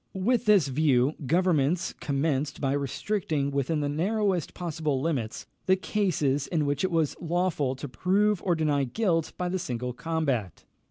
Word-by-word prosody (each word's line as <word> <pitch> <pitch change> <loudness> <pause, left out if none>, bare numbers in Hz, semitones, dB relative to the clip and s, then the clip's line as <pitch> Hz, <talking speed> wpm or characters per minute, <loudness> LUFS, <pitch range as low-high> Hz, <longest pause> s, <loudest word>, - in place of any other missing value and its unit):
With 240 +5 +1
this 200 -8 +5
view, 135 -1 +2
governments 170 0 +2
commenced 145 0 -1
by 135 -2 0
restricting 145 - -1
within 140 +3 0
the 145 - 0
narrowest 185 +3 0
possible 155 -5 -2
limits 130 -7 -2 0.2
the 190 - +5
cases 155 -9 0
in 160 -4 0
which 145 +3 -1
it 185 - +2
was 165 -4 +1
lawful 170 -6 0
to 145 +2 -6
prove 195 +7 +1
or 175 -3 +1
deny 150 -3 +1
guilt 165 - 0
by 180 - -1
the 185 +1 -1
single 125 -4 -3
combat. 140 - -2
155 Hz, 155 wpm, -27 LUFS, 140-180 Hz, 0.2 s, this